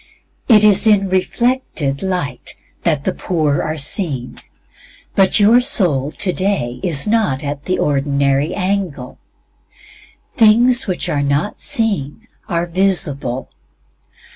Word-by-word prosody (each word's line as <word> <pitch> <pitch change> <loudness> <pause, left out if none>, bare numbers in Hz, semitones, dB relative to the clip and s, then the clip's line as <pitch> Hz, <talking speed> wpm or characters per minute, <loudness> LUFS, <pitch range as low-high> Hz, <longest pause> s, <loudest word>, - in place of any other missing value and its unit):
It 215 -4 +5
is 210 +1 +5
in 200 -3 +3
reflected 185 - -1
light 180 -10 -3 0.3
that 155 -5 0
the 185 - -1
poor 155 -5 -1
are 155 +1 -3
seen. 140 - -3 0.7
But 195 +2 +3
your 225 +4 +5
soul 170 - +1
today 185 -8 -1
is 160 -7 +1
NOT 210 -11 0
AT 145 0 -5
THE 185 - -1
ORDINARY 140 +1 0
ANGLE. 185 -9 -3 1.2
"Things 235 +3 +4
which 185 -2 -3
are 145 - -1
not 140 +7 -2
seen" 215 - -2 0.2
are 170 -2 -1
visible. 170 -8 0
175 Hz, 115 wpm, -17 LUFS, 140-205 Hz, 1.2 s, It